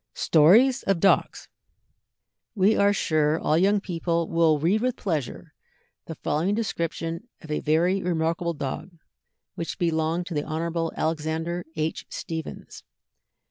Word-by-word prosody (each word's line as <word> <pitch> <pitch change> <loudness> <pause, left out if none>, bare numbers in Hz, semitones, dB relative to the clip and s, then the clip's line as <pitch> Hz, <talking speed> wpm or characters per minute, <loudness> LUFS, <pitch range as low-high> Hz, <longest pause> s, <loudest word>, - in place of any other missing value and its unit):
STORIES 225 - +5
OF 195 -3 +2
DOGS. 195 +3 +2 1.1
We 205 +2 +4
are 200 0 +4
sure 155 -5 +1
all 155 - +1
young 200 +5 +3
people 170 -3 -2
will 165 -2 +3
read 175 +9 +1
with 255 0 0
pleasure 155 - -4 0.5
the 160 - -6
following 165 +8 -1
description 170 -3 -3
of 160 - -9
a 150 - 0
very 175 +5 +1
remarkable 170 -1 -1
dog 150 +5 -5 0.6
which 165 - -5
belonged 165 0 0
to 175 - -6
the 150 - 0
Hon. 165 +1 -2
Alexander 160 +2 -2
H. 155 0 -3
Stephens. 160 -2 -7
165 Hz, 130 wpm, -25 LUFS, 160-185 Hz, 1.1 s, STORIES